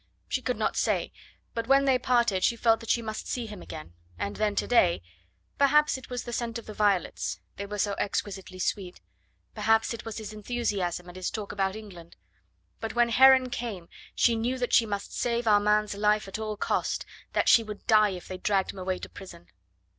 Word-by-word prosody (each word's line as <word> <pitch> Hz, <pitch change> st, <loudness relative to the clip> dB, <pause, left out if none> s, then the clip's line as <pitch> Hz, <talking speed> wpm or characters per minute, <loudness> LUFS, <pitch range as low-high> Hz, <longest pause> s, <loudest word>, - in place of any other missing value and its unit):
she -, -, -1 dB
could -, -, -2 dB
not -, -, 0 dB
say... -, -, 0 dB, 0.4 s
but 230 Hz, -1 st, -3 dB
when 275 Hz, +1 st, +5 dB
they 260 Hz, -2 st, +3 dB
parted 235 Hz, -7 st, +2 dB
she 235 Hz, -, +3 dB
felt 225 Hz, -1 st, +3 dB
that 230 Hz, -, -10 dB
she 235 Hz, -, +2 dB
must 220 Hz, 0 st, -5 dB
see 245 Hz, -2 st, -2 dB
him 210 Hz, -4 st, -9 dB
again... 155 Hz, -, -9 dB, 0.2 s
and 100 Hz, +2 st, -3 dB
then 210 Hz, -1 st, 0 dB
today... 190 Hz, -5 st, +3 dB, 0.6 s
perhaps 300 Hz, +2 st, +4 dB
it 260 Hz, -, -9 dB
was 250 Hz, -1 st, -4 dB
the 240 Hz, -, -6 dB
scent 235 Hz, 0 st, -2 dB
of 230 Hz, -, -9 dB
the 215 Hz, -, -8 dB
violets... 205 Hz, -4 st, 0 dB, 0.2 s
they 200 Hz, -, -5 dB
were 210 Hz, +1 st, -5 dB
so 205 Hz, 0 st, +1 dB
exquisitely 195 Hz, -2 st, -3 dB
sweet... 185 Hz, 0 st, -3 dB, 0.5 s
perhaps 225 Hz, +1 st, +2 dB
it 230 Hz, -, -7 dB
was 225 Hz, -2 st, -6 dB
his 215 Hz, -1 st, -6 dB
enthusiasm 205 Hz, -6 st, -2 dB
and 175 Hz, +1 st, -10 dB
his 185 Hz, -, -2 dB
talk 210 Hz, -2 st, -5 dB
about 195 Hz, -1 st, -1 dB
England... 185 Hz, -6 st, -11 dB, 0.6 s
but 225 Hz, 0 st, -5 dB
when 240 Hz, 0 st, +4 dB
Heron 260 Hz, +1 st, +6 dB
came 215 Hz, -8 st, -5 dB, 0.3 s
she 235 Hz, -, +3 dB
knew 240 Hz, +3 st, -1 dB
that 245 Hz, -1 st, -2 dB
she 230 Hz, -, +5 dB
must 200 Hz, -1 st, -4 dB
save 235 Hz, 0 st, 0 dB
Armand's 210 Hz, 0 st, +3 dB
life 210 Hz, 0 st, +1 dB
at 195 Hz, -, -5 dB
all 215 Hz, -1 st, -4 dB
cost... -, -, -1 dB, 0.3 s
that -, -, +1 dB
she 230 Hz, -, +7 dB
would 210 Hz, -2 st, -8 dB
die 215 Hz, -1 st, +5 dB
if 185 Hz, -2 st, -7 dB
they 185 Hz, 0 st, -6 dB
dragged 195 Hz, -1 st, +1 dB
him 195 Hz, -, -10 dB
away 185 Hz, 0 st, -2 dB
to -, -, -7 dB
prison. 175 Hz, -3 st, -12 dB
215 Hz, 205 wpm, -28 LUFS, 195-235 Hz, 0.6 s, she